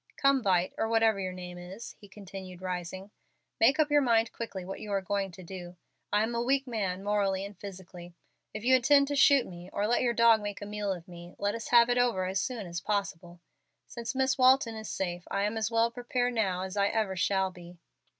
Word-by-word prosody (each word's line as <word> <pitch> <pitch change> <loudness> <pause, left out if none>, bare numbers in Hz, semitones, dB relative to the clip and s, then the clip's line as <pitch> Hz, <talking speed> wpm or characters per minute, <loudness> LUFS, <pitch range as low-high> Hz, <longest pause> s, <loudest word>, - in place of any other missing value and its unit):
Come, 275 -1 +3
Vight, 185 -4 +1
or 225 - +1
whatever 225 -2 +3
your 185 -1 -3
name 180 -1 -8
is," 190 +6 -9
he 205 - -13
continued, 190 -2 -10
rising, 185 +1 -5 0.5
"make 265 +7 +4
up 300 -1 +3
your 290 0 +5
mind 230 -3 +2
quickly 195 -6 -6
what 195 - -6
you 210 - -7
are 200 - +2
going 195 +1 -2
to 185 - -11
do. 175 0 -9 0.4
I 210 +1 +3
am 230 +2 -2
a 235 - 0
weak 270 +3 +1
man, 195 -6 -3
morally 200 -2 0
and 200 0 -9
physically. 180 -2 -10 0.4
If 215 - -7
you 260 +2 +5
intend 280 +3 +4
to 285 - -1
shoot 275 -2 +5
me, 175 0 -10
or 205 - -1
let 240 +3 +2
your 240 -2 +1
dog 230 -1 +5
make 205 -1 -5
a 205 - -7
meal 205 -1 -3
of 175 -3 -6
me, 175 -1 -11
let 205 0 -1
us 230 0 -5
have 235 -1 +6
it 245 0 +2
over 235 -7 +1
as 190 +1 -1
soon 240 -6 -4
as 170 -1 -5
possible. 180 -4 -3 0.4
Since 235 +1 -6
Miss 265 0 +1
Walton 255 -2 +5
is 220 -1 -7
safe, 175 -2 -4
I 200 - -1
am 210 +2 -1
as 220 -1 -1
well 230 0 +2
prepared 245 0 -1
now 190 -6 0
as 190 +1 -6
I 200 -1 +2
ever 210 -3 -1
shall 190 +1 +1
be." 175 -1 -13
205 Hz, 225 wpm, -29 LUFS, 185-235 Hz, 0.5 s, have